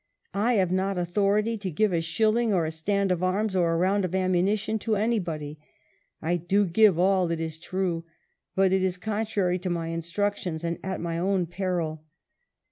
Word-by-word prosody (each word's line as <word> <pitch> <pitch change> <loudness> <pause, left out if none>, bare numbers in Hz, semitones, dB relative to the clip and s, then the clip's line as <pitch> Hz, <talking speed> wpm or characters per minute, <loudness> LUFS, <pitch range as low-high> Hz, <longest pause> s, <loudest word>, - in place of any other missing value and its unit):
" - - -43 0.2
I - - +4
have 190 -5 +2
not 190 +1 0
authority 205 +5 +1
to 195 -2 -3
give 195 +4 +1
a 165 - +1
shilling, 220 +7 +1
or 175 -5 +2
a 160 - -2
stand 195 +4 0
of 180 -1 0
arms, 190 +2 0
or 175 -2 +2
a 165 - +1
round 190 +3 +2
of 185 0 -2
ammunition 190 +4 +1
to 220 0 0
anybody. 170 -9 -2 0.6
I 175 +2 +1
do 195 +5 +2
give 195 0 +4
all, 185 -1 +3
it 170 -1 -1
is 160 -1 -4
true, 175 -2 -2 0.5
but 190 -1 +3
it 190 - +3
is 185 -1 0
contrary 205 -3 -1
to 180 +1 -3
my 165 -1 -2
instructions 170 0 -2
and 170 0 -2
at 190 0 -3
my 170 -1 -2 0.3
peril." 175 -5 -2
185 Hz, 185 wpm, -26 LUFS, 170-205 Hz, 0.6 s, I